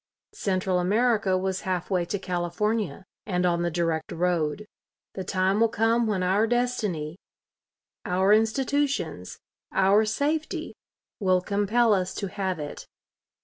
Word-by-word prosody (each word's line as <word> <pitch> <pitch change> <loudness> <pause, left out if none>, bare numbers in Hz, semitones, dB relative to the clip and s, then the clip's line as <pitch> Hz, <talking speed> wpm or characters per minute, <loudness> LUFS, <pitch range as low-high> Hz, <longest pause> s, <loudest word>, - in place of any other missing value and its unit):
Central 185 - 0
America 205 0 +2
was 190 0 -2
half 185 0 -3
way 180 -2 +1
to 200 - -2
California 190 +3 -2 0.2
and 180 -3 0
on 170 -1 +2
the 175 - +1
direct 165 -1 -1
road. 175 +2 0 0.5
The 190 - -5
time 190 +2 +1
will 230 0 +4
come 225 +1 +2
when 195 -4 0
our 195 +5 +2
destiny, 215 -10 -1 0.8
our 190 +3 +3
institutions, 270 +6 0 0.3
our 195 +3 +4
safety 295 +8 -2 0.5
will 185 -3 +3
compel 210 +4 +2
us 185 -2 -1
to 200 - -3
have 190 -2 -2
it. 150 -1 -7
195 Hz, 130 wpm, -26 LUFS, 180-220 Hz, 0.8 s, will